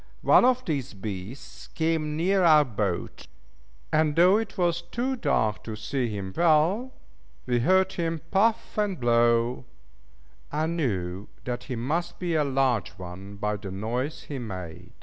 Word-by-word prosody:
One - - +6
of 255 0 +2
these 140 -9 -3
beasts 100 +5 -7
came 160 -2 -1
near 190 +3 +2
our 155 -3 +6
boat, 100 -7 -3 0.7
and 155 -1 +3
though 180 +4 +6
it 220 -2 -4
was 175 -1 +1
too 240 +10 -2
dark 140 - 0
to 110 - -5
see 120 +3 -2
him 100 -3 -5
well, 175 +10 +3 0.5
we 125 -1 +1
heard 190 +7 +3
him 165 -3 -2
puff 215 +2 +1
and 205 -4 0
blow, 120 0 +2 0.9
and 155 +3 -1
knew 95 - -2 0.2
that 125 -1 -4
he 130 - -4
must 155 +9 -2
be 175 -2 -2
a 155 -2 +3
large 135 -5 +1
one 95 +2 -9
by 105 +1 -2
the 100 -1 -8
noise 120 +10 -3
he 140 -3 -6
made. 95 -8 -7
140 Hz, 150 wpm, -26 LUFS, 110-175 Hz, 0.9 s, One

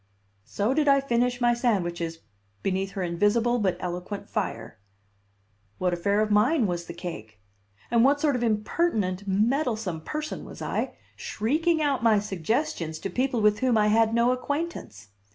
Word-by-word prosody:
So 210 +5 0
did 295 +1 +1
I 275 0 +6
finish 245 -2 0
my 240 -1 +3
sandwiches 175 -9 -1 0.4
beneath 195 0 -1
her 190 - -3
invisible 205 +8 +2
but 190 -4 0
eloquent 180 +3 -5
fire. - - -4 1.0
What 180 -1 0
affair 200 +4 +1
of 215 0 0
mine 235 +6 +3
was 175 -2 -2
the - - -6
cake? 110 - -8 0.5
And 235 -1 +4
what 280 +2 +4
sort 290 -2 +2
of 250 - -2
impertinent, 210 - 0
meddlesome 215 - 0
person 305 - -5
was - - -10
I, - - -3 0.2
shrieking 315 +8 0
out 280 -3 +1
my 225 -2 +4
suggestions 190 - -2
to 195 +4 -5
people 250 +1 0
with 210 0 +3
whom 255 -3 +2
I 210 0 +3
had 225 +1 +4
no 235 +2 +3
acquaintance? 255 - -4
215 Hz, 155 wpm, -26 LUFS, 185-250 Hz, 1.0 s, I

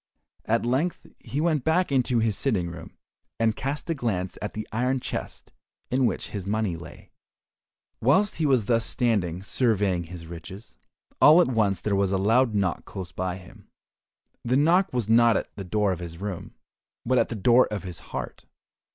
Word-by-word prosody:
At 115 +1 +1
length 135 +9 -1
he 140 - -4
went 155 -4 +1
back 160 +1 +2
into 125 -2 +2
his 110 -2 +1
sitting 95 -11 -1
room, 85 - -11 0.4
and 110 -1 +2
cast 140 +7 -4
a 165 - 0
glance 100 - -2
at 105 - -5
the 110 - -5
iron 125 +4 0
chest - - -6 0.4
in 130 0 +3
which - - -3
his 100 -2 -5
money 105 -3 0
lay. 80 -1 -12 0.9
Whilst 190 - +3
he 155 -2 +1
was 130 -6 +3
thus 115 0 +2
standing 95 -8 0
surveying 100 -6 +1
his 85 0 -9
riches, 85 +6 -10 0.5
all 155 +3 +8
at 175 - +4
once 105 -6 +1
there 105 -2 0
was 100 -1 +1
a 95 - +2
loud 115 +4 +3
knock 95 -4 0
close 95 -2 -8
by 95 0 -3
him. 90 -1 -16 0.7
The 125 +2 +1
knock 175 +6 +3
was 120 -4 -1
not 115 0 +5
at - - -5
the 100 - -6
door 100 +2 +1
of 90 - -3
his 85 -2 -7
room, 100 -1 -6 0.5
but 125 +1 +3
at - - +1
the 115 - -4
door 120 +5 +4
of 105 -2 -4
his 90 -3 -7
heart. - - -6
110 Hz, 185 wpm, -26 LUFS, 95-130 Hz, 0.9 s, all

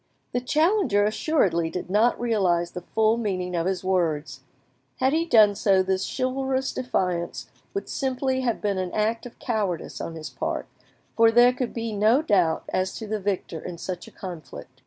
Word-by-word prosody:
The 245 - -1
challenger 305 - +2
assuredly 200 - +1
did 180 - -5
not 220 +4 +3
realise 185 -7 +1
the 180 - -6
full 220 +4 +1
meaning, 185 -5 -2
of 170 +1 0
his 190 -1 -1
words; 160 -7 0 0.6
had 265 +2 +2
he 330 +2 +1
done 215 -8 +6
so, 195 -1 +3
this 190 0 0
chivalrous 265 0 -1
defiance 180 -9 -2 0.2
would 395 - -3
simply 260 -1 -1
have 240 -3 -1
been 200 -2 0
an 185 -1 -3
act 225 +3 0
of 240 - -15
cowardice 205 -8 -2
on 165 - -5
his 155 -1 -7
part, - - -3 0.5
for 230 0 +6
there 240 +2 +6
could 250 -1 -3
be 230 -1 -3
no 220 +8 +3
doubt 180 - +2
as 185 0 -1
to 220 - -6
the 215 0 -2
victor 190 -4 -2
in 175 -1 -7
such 180 +1 -6
a - - -12
conflict. 160 -8 -9
210 Hz, 180 wpm, -25 LUFS, 180-245 Hz, 0.6 s, done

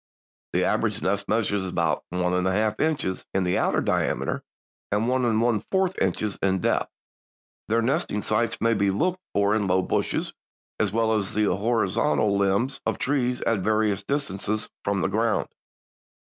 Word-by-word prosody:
The - - +2
average - - 0
nest 100 +1 0
measures 105 -3 +1
about 85 -3 0
one 90 0 0
and 90 0 +1
one 95 0 +1
half 110 0 0
inches 150 -12 0
in 95 - +2
the 90 0 +1
outer - - +1
diameter - - 0 0.5
and 105 +3 +1
one 130 0 +1
and 110 -2 +2
one 115 -3 +1
fourth 190 -1 +1
inches 95 +2 -1
in 95 -1 +2
depth. - - 0 0.8
"Their 115 +1 +2
nesting 115 -4 0
sites 110 +2 0
may 115 0 +3
be 100 -2 +2
looked 175 - 0 0.2
for 100 +1 +3
in 105 -2 +1
low 95 0 +2
bushes - - -1 0.5
as 105 -3 +1
well 110 +1 +2
as 105 -2 -1
on 105 - +3
the 100 - +2
horizontal 110 0 +1
limbs 100 +7 +1
of - - -1
trees 125 -3 0
at 115 -3 +1
various 105 0 +1
distances 110 -4 -2
from 100 -1 0
the - - +1
ground." - - 0
105 Hz, 175 wpm, -25 LUFS, 95-115 Hz, 0.8 s, may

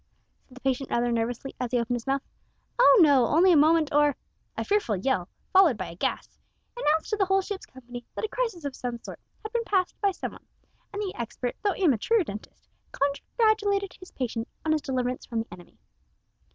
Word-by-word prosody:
said 255 - -18
the 255 - -13
patient 265 0 -1
rather 240 0 +1
nervously, 235 +3 -2
as 250 -1 -2
he 250 - +1
opened 235 +1 0
his 240 +1 -6
mouth. 275 0 0 0.6
"Oh - - +8
no. 275 -6 +5
Only 355 +5 +5
a - - +6
moment 310 0 +4
or 295 -1 +4 0.2
" - - -41
A - - -1
fearful 405 - +1
yell, 190 -2 -1 0.2
followed 370 - +6
by 185 - -5
a - - -11
gasp, - - -3 0.4
announced 320 -8 +1
to 425 - +1
the 395 - +3
whole 385 +1 +2
ship's 395 0 -6
company 245 -1 -10
that - - -2
a - - -2
crisis 440 -9 -3
of 275 -2 -4
some 245 -1 -4
sort - - -9 0.2
had 435 +1 -7
been 470 -1 +1
passed 380 -4 +1
by 400 - +4
some 380 - -5
one, - - -16 0.4
and 410 +1 -3
the 385 - -3
expert 240 +1 -4
though 405 -2 +1
amateur 370 - +2
dentist 210 -8 -9 0.2
congratulated 400 - +1
his 370 - -14
patient 230 -3 -3 0.2
on 315 - +2
his 310 -1 +2
deliverance 255 -2 -2
from 230 -1 -1
the 225 - -14
enemy. 175 -1 -14
285 Hz, 205 wpm, -27 LUFS, 245-390 Hz, 0.6 s, Oh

